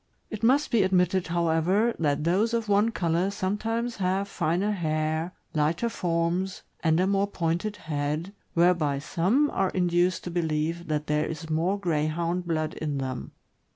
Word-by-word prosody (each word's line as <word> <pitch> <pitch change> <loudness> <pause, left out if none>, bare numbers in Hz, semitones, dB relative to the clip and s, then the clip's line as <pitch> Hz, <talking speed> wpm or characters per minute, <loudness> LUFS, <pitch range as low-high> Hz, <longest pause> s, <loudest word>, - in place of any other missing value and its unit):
It 215 - -5
must 265 +6 +3
be 230 -4 +4
admitted, 185 -1 +2
however, 170 +6 +2
that 150 -2 +1
those 200 +8 +2
of 230 -2 -1
one 205 +2 +3
color 175 -3 0
sometimes 215 +4 -2
have 190 +1 0
finer 180 +2 0
hair, 155 -2 -1 0.2
lighter 160 +8 +1
forms, 175 0 -1 0.2
and 160 0 +3
a 185 - +3
more 200 +1 +2
pointed 175 +2 -2
head, 155 +2 -3 0.2
whereby 170 -5 +3
some 190 - +1
are 190 -1 +1
induced 180 0 +1
to 175 - -5
believe 165 0 -1
that 150 -1 -1
there 150 +1 0
is 160 0 -6
more 170 +6 +1
Greyhound 170 +1 -1
blood 155 -2 -1
in 150 -2 -3
them. 130 -2 -4
175 Hz, 155 wpm, -27 LUFS, 160-195 Hz, 0.2 s, be